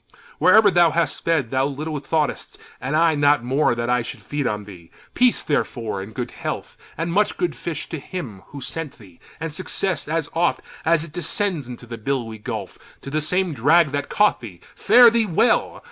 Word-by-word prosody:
Wherever 215 -2 +6
thou 175 -2 +5
hast 165 +2 -1
fed, 155 -8 +1
thou 130 +1 +1
little 150 +2 -4
thought'st, 150 +1 -2 0.2
And 135 +4 -2
I 165 0 +4
not 145 -3 +3
more, 130 0 +2
that 120 0 -2
I 125 0 +2
should 115 - -7
feed 145 -3 -2
on 105 -1 -2
thee. 90 -5 -13 0.2
Peace, 250 -1 +3
therefore, 115 -8 -2
and 100 +3 -8
good 120 +2 -5
health, - - -5 0.2
and 165 +2 -2
much 210 +2 +1
good 175 - -1
fish, 160 -3 -5
To 160 - -4
him 135 - -7
who 140 - -9
sent 150 +3 -5
thee! 95 -6 -17 0.2
and 165 -2 -4
success, 185 0 -2
as 160 -1 -1
oft 170 +1 +1 0.2
As 165 -1 +3
it 160 -2 -11
descends 175 - -2
into 125 0 -9
the 115 -1 -8
billowy 115 -3 -3
gulf, 105 -4 -6 0.2
To 140 - -7
the 155 +1 0
same 180 +2 0
drag 150 +4 +4
that 145 -1 -3
caught 210 0 +2
thee! 100 -8 -10 0.2
Fare 240 -1 +7
thee 230 -1 +1
well! 190 +7 +2
150 Hz, 195 wpm, -22 LUFS, 120-170 Hz, 0.2 s, Fare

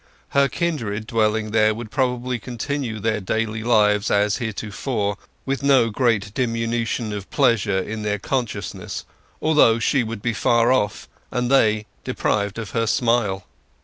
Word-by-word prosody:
Her 140 0 +3
kindred 120 - -2
dwelling 110 -2 0
there 110 -1 +3
would 110 -1 -7
probably 125 -1 -1
continue 120 0 -4
their 110 0 0
daily 110 +3 -2
lives 105 -3 +3
as 105 0 +2
heretofore, 110 -1 -3 0.3
with 135 +1 -1
no 135 -5 +4
great 105 -4 +1
diminution 115 -2 -1
of 100 -2 -6
pleasure 115 -8 +2
in 110 +3 -3
their 105 -1 -1
consciousness, 120 +3 -4 0.4
although 150 -8 +5
she 125 +4 +2
would 110 -2 -6
be 120 - 0
far 120 +2 +3
off, 115 -6 0 0.2
and 125 +1 -1
they 110 -5 +3 0.2
deprived 100 0 -1
of 110 -4 -5
her 115 -1 0
smile. 115 -5 +1
115 Hz, 145 wpm, -22 LUFS, 105-125 Hz, 0.4 s, although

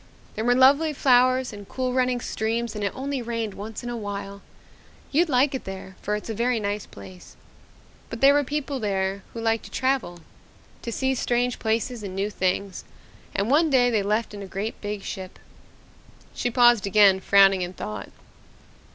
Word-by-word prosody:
There 220 - -3
were 245 +1 +3
lovely 280 +5 +5
flowers 255 -2 +3
and 205 -1 -10
cool 255 -1 -2
running 250 -1 +1
streams 230 +1 -2
and 210 -1 -5
it 200 - 0
only 270 0 -3
rained 230 -3 -3
once 215 +3 -7
in 240 - -5
a - - -4
while. 200 -2 -6 0.7
You'd 325 +4 +2
like 270 +1 +3
it 265 - -4
there 190 0 -8
for 210 - -1
it's 210 - -6
a 225 - -3
very 235 +2 0
nice 205 -1 -3
place. 95 -2 -13 0.7
But 230 - -6
there 275 +2 +6
were 290 0 +3
people 285 0 -3
there 195 -2 -1
who - - -4
liked 225 0 0
to - - -10
travel 260 -10 -1 0.6
to 235 - -5
see 265 +3 0
strange 245 -1 0
places 225 +2 -1
and 195 -2 -6
new 200 +2 -1
things, 190 0 -2 0.5
and 200 +5 0
one 315 +3 +4
day 245 -3 +4
they 215 -3 +2
left 210 +2 -1
in 205 - -7
a 195 - -7
great 200 +4 -5
big 205 -1 -5
ship." 185 -1 -7 1.0
She 245 - -2
paused 240 -3 +4
again, 200 -1 +5
frowning 195 -1 +5
in 180 0 -4
thought. 105 - -6
225 Hz, 185 wpm, -24 LUFS, 200-255 Hz, 1.0 s, there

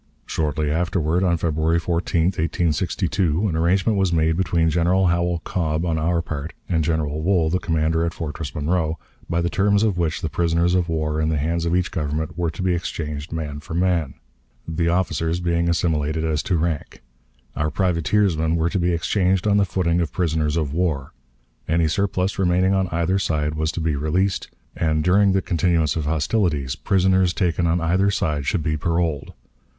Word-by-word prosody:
Shortly 75 -1 -1
afterward, 85 +1 0
on 85 -2 +2
February 80 0 +1
14, 85 0 0
1862, 85 +2 0
an 85 - -2
arrangement 90 +5 +2
was 95 -2 +2
made 80 -1 +2
between 85 -2 +1
General 90 +3 +2
Howell 85 -1 +1
Cobb 80 -1 -1
on 80 -2 0
our 85 +1 0
part 75 +2 -5
and 80 -3 +1
General 80 -1 -1
Wool, 85 -2 +2
the 90 - +1
commander 80 -1 0
at 85 0 -2
Fortress 80 -1 -5
Monroe, 80 +1 0 0.3
by 85 +1 +1
the 85 - 0
terms 100 +1 +2
of 100 -5 +1
which 85 +1 -1
the - - -1
prisoners 85 +2 +1
of 90 -2 +1
war 80 -1 -1
in 80 - +1
the 80 - 0
hands 85 +3 -1
of 85 +1 +1
each 90 0 0
Government 75 -1 -3
were 85 -1 -1
to 85 +3 -6
be 90 -1 +2
exchanged 75 -3 -4
man 75 -3 -4
for 80 +2 -7
man, 85 -5 0 0.5
the 85 +1 -1
officers 85 -1 0
being 85 -1 0
assimilated 80 -2 0
as 80 -1 0
to 90 - 0
rank; 80 -5 -3 0.5
our 75 +1 0
privateersmen 85 -2 +1
were 85 +1 0
to 95 - 0
be 85 0 +1
exchanged 90 +2 +1
on 105 -1 +3
the 100 - +3
footing 90 -2 0
of 80 - -2
prisoners 80 -3 0
of 75 -3 -1
war; 80 -6 -1 0.6
any 80 0 +2
surplus 95 +2 -1
remaining 95 +1 +2
on 95 -1 +1
either 85 +3 0
side 75 -4 -1
was 80 +1 -1
to 85 - -5
be 80 -2 0
released; 90 +7 0 0.3
and 80 -1 0
during 95 +3 +4
the 95 - +1
continuance 85 -3 +1
of 80 -3 -2
hostilities 75 - 0
prisoners 95 -1 +2
taken 85 -1 +1
on 85 +2 +2
either 90 +4 +2
side 75 -8 -1
should 90 -6 0
be 80 0 0
paroled. 80 -1 -1
85 Hz, 185 wpm, -22 LUFS, 80-90 Hz, 0.6 s, during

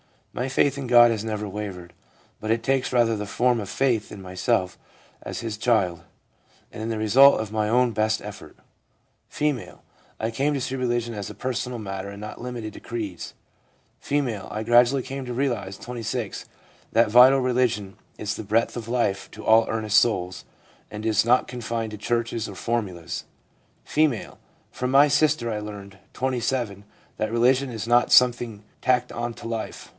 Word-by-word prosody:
My 125 - -2
faith 135 +1 +1
in 135 -2 -4
God 120 -1 +7
has 110 -1 -2
never 105 -1 -3
wavered, 95 -4 -6 0.5
but 110 - -5
it 115 0 0
takes 135 0 0
rather 115 -3 +3
the 105 - -4
form 120 +3 +1
of 100 - -5
faith 120 -6 0
in 100 - -9
myself 95 +1 -1 0.4
as - - -6
His 115 -3 -4
child, 100 -7 +1 0.7
and - - -8
in 110 - -3
the 115 - -2
result 125 +6 +6
of 110 -2 -6
my 110 -1 0
own 125 +2 +3
best 110 0 0
effort/ - - -10 0.7
F. 150 -5 -2 0.2
' - - -33
I 110 +1 -1
came 140 +6 0
to 135 - -2
see 135 +1 -3
religion 120 -2 -1
as 100 -2 -5
a - - -9
personal 125 -1 -3
matter 95 -2 -5
and 100 0 -9
not 105 +1 -8
limited 120 -3 -6
to - - -10
creeds.' 105 -7 -6 0.7
F. 145 0 0 0.2
* - - -11
I 105 +1 -3
gradually 120 +3 +4
came 135 +1 -6
to 125 - -5
realise 120 -7 -2
(26) 120 -2 -5 0.5
that 115 -1 +4
vital 130 +3 +8
religion 120 -6 0 0.2
is 105 0 -3
the - - -6
breath 110 +4 0
of 115 -1 -6
life 115 -5 -1
to 110 - -10
all 110 +1 +5
earnest 110 -1 +3
souls, 95 -6 -1 0.4
and 105 +1 -7
is 110 -1 +3
not 125 +2 +3
confined 115 -2 -4
to 105 - -7
churches 115 +1 -1
or 100 - -9
formulas/ 95 -5 -3 0.6
F. 150 -7 +1 0.5
'From 125 0 -3
my 140 +2 +6
sister 145 -4 +2
I 105 - -2
learned 100 -2 -9 0.2
(27) 120 -5 -2 0.3
that 110 0 -2
religion 130 +3 +3
is 115 -3 -5
not 120 +1 +3
something 120 -4 +4 0.2
tacked 125 -1 +1
on 120 0 -3
to - - -8
life. 115 -1 -5
115 Hz, 180 wpm, -24 LUFS, 105-125 Hz, 0.7 s, vital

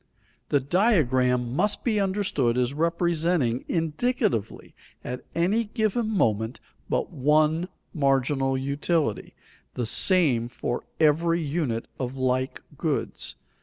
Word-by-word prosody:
The 145 - +3
diagram 130 - +2
must 205 +6 0
be 220 -4 +1
understood 185 - 0
as 125 +1 +1
representing 165 -5 +1
indicatively 160 - -1 0.3
at 125 +1 -5
any 200 +7 +2
given 220 +1 -1
moment 110 - 0 0.3
but - - -1
one 155 +5 +2 0.3
marginal 135 -2 +1
utility, 140 - -1 0.4
the 120 - -1
same 135 - +3
for 120 0 -4
every 165 +2 +3
unit 140 -7 -2
of 130 0 -4
like 130 0 -1 0.2
goods. - - -2
150 Hz, 105 wpm, -26 LUFS, 125-175 Hz, 0.4 s, The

